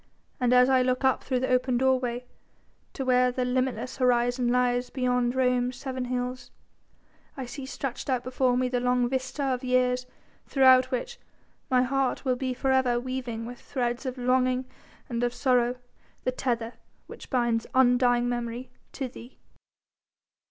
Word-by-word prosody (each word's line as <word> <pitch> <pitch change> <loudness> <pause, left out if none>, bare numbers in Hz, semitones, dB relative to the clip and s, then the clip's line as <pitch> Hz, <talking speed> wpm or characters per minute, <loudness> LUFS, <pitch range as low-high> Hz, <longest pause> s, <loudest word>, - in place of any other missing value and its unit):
And 250 -1 +2
as 250 0 +6
I 260 -1 +4
look 255 +1 0
up 265 0 +2
through 255 -2 -1
the 260 - -1
open 250 0 +2
doorway 250 -1 +1 0.7
to 270 - -4
where 250 0 +3
the 250 0 -1
limitless 255 0 -1
horizon 245 -1 +2
lies 245 0 +1
beyond 250 -1 0
Rome's 250 -1 +1
seven 260 -1 -4
hills, 250 0 -4 0.9
I 265 - -4
see 265 +2 -7
stretched 270 0 -5
out 255 -2 0
before 255 -1 +1
me 255 0 +1
the 250 0 -1
long 250 0 +2
vista 260 +2 -3
of 260 -1 -1
years 250 0 +1 0.4
throughout 260 -2 +5
which 265 - -4 0.5
my 255 -2 +4
heart 270 +1 -1
will 255 -1 +2
be 255 0 -3
for 265 +1 0
ever 255 -2 +2
weaving 245 -3 -4
with 245 +1 -8
threads 245 0 -3
of 255 0 -4
longing 255 +1 +1 0.4
and 235 -1 -3
of 245 0 -1
sorrow 250 -2 +2 0.5
the 255 - 0
tether 235 -2 -2 0.3
which - - -12
binds 240 -3 0
undying 245 -1 +4
memory 240 +1 -4 0.2
to 270 - -3
thee." 245 0 -13
250 Hz, 160 wpm, -27 LUFS, 245-260 Hz, 0.9 s, as